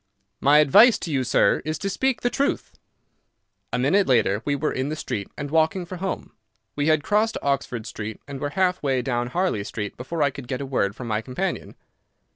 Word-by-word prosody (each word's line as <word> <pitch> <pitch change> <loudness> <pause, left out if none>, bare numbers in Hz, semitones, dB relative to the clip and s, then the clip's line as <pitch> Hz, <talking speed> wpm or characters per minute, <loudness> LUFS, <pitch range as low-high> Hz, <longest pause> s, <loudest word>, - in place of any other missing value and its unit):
"My 145 +2 +5
advice 205 - +7
to 165 - -5
you, 135 -3 +1
sir, 120 -4 +3
is 155 +2 -2
to 195 - -4
speak 255 +5 0
the 245 - 0
truth." 280 +1 -1 1.0
A - - 0
minute 175 +11 +3
later 115 -5 +2
we 145 - +1
were 150 +2 -1
in 130 +2 -2
the 155 - -2
street 120 -9 -4
and 145 -1 -5
walking 160 +3 +2
for 185 +1 -7
home. 190 +2 -4 0.4
We 145 +1 0
had 155 -2 +3
crossed 215 +5 +1
Oxford 135 -5 -1
Street 110 0 -6
and 140 -1 -6
were 145 - -2
half 185 -1 +2
way 130 -3 0
down 120 -2 -1
Harley 170 - -1
Street 105 0 -5
before 150 +5 -2
I 140 - +2
could 135 -2 -9
get 125 0 -3
a 140 - -4
word 105 -7 0
from 125 - -7
my 110 -1 -1
companion. 135 +11 -4
140 Hz, 210 wpm, -24 LUFS, 125-175 Hz, 1.0 s, advice